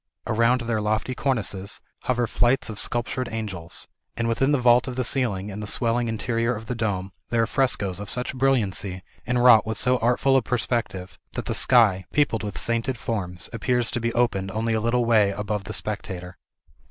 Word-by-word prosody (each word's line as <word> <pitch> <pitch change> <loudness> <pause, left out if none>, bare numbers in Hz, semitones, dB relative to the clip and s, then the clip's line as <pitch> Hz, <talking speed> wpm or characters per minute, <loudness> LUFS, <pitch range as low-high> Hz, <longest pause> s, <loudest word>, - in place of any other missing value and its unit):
Around 115 +3 +2
their 115 -2 -1
lofty 110 +4 -1
cornices 105 -7 -2 0.3
hover 125 -1 +1
flights 120 +1 +1
of 105 - -7
sculptured 120 +1 -1
angels; 100 -7 -4 0.3
and 115 0 0
within 135 +5 +2
the 145 - +4
vault 125 0 +4
of 130 - -4
the 130 - 0
ceiling 110 -6 -1
and 100 +2 -6
the 105 - -5
swelling 120 +2 0
interior 115 +2 -1
of 110 +1 -8
the 125 - -3
dome, 100 -5 -2 0.2
there 115 -1 +2
are - - +2
frescos 105 -8 0
of 105 - -6
such 125 +2 -2
brilliancy, 100 -8 0 0.2
and 120 0 +1
wrought 115 -4 +8
with 110 -1 -2
so 125 0 +2
artful 125 +3 +2
a - - +3
perspective, 115 -6 -2
that - - -4
the - - -2
sky, 105 -7 +4
peopled 140 -6 +1
with 105 -2 -5
sainted 115 +2 -1
forms, 90 -6 -4
appears 120 +1 0
to - - -2
be 115 0 0
opened 110 -6 +1
only 110 +3 -1
a 110 - 0
little 120 +2 +1
way 110 -4 +4
above 105 0 -3
the 105 - -6
spectator. 95 -4 -4
115 Hz, 190 wpm, -24 LUFS, 105-125 Hz, 0.3 s, wrought